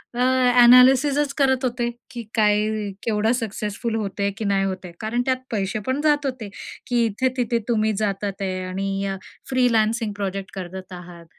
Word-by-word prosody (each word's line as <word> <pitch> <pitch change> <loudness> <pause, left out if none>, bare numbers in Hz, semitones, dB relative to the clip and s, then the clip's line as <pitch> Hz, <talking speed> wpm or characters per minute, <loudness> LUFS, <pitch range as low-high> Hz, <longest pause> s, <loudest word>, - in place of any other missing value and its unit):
अ, - - -4 0.4
एनालिसिसच 270 +4 +6
करत 265 -2 +2
होते, 240 -1 -1 0.2
की 240 -2 -6
काय 210 -1 +3 0.4
केवढं 220 0 +1
सक्सेसफुल 220 +1 -3
होत 205 -3 -4
आहे 200 0 +1
की 220 - -4
नाही 200 -1 +1
होत 190 -1 -4
आहे. 175 - -9
कारण 225 +3 -1
त्यात 260 -1 +1
पैसे 200 -1 -1
पण 260 +3 0
जात 295 -1 +2
होते, 255 -6 -4 0.4
की 240 -1 +2
इथे-तिथे 245 +1 0
तुम्ही 220 -2 +1
जातात 200 -1 -3
आहे 185 -1 -2
आणि 195 +1 -2
अ, 195 -1 -3 0.3
फ्रीलान्सिंग 230 -3 +1
प्रोजेक्ट 195 -1 -4
करत 185 0 -7
आहात 175 -1 -11
220 Hz, 165 wpm, -22 LUFS, 195-250 Hz, 0.4 s, एनालिसिसच